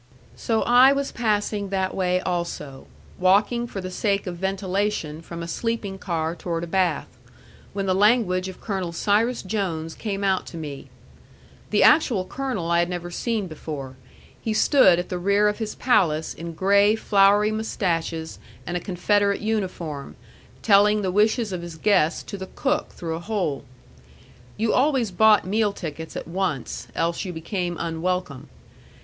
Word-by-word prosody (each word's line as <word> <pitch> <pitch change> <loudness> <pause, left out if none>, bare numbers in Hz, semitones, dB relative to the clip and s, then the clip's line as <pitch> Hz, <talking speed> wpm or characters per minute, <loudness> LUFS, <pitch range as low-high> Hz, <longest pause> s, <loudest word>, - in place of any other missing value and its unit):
So 225 -1 0
I 250 +3 +6
was 280 0 -2
passing 210 -3 -1
that 190 -1 -1
way 180 -1 0
also, 170 -7 -4 0.3
walking 205 +6 +3
for 195 - -6
the 185 0 -6
sake 200 +1 0
of 180 -2 -4
ventilation 190 -4 -2
from 170 0 -7
a - - -6
sleeping 205 0 -3
car 165 -3 -2
toward 170 -1 -3
a - - -2
bath, 175 -3 0 0.7
when 195 0 -2
the 190 - +2
language 195 -2 +3
of 190 - -9
Colonel 190 -5 -3
Cyrus 220 +7 +1
Jones 180 -6 -3
came 200 -2 -4
out 190 -1 +1
to 170 - -8
me. 145 -4 -7 0.8
The - - +3
actual 250 - +4
colonel 240 -8 -3
I 170 - +4
had 175 0 +1
never 175 -1 -5
seen 225 +2 -2
before. 150 -5 -7 0.5
He 220 -1 -2
stood 215 - +5
at 175 - -3
the 180 - -3
rear 200 +3 +3
of 210 +2 -1
his 220 -2 -4
palace 160 -11 +2
in 170 0 -7
gray 200 +5 +4
flowery 205 0 +4
mustaches 170 -7 -2 0.3
and 175 - -4
a - - 0
Confederate 200 +3 +1
uniform, 185 -9 -3 0.5
telling 210 0 +4
the 185 - 0
wishes 215 +1 +2
of 180 - -3
his 170 -1 -8
guests 180 -4 +2
to 200 - -7
the 190 - -6
cook 290 +2 0
through 165 -2 -5
a 160 - -4
hole. 170 -8 -2 0.9
You 220 +1 +1
always 260 -5 +2
bought 215 +2 +5
meal 210 +2 +1
tickets 160 -4 -7
at - - -6
once, 175 -7 -3
else 170 +2 -1
you 185 - -4
became 175 +1 -3
unwelcome. 170 -4 -3
190 Hz, 160 wpm, -24 LUFS, 170-210 Hz, 0.9 s, I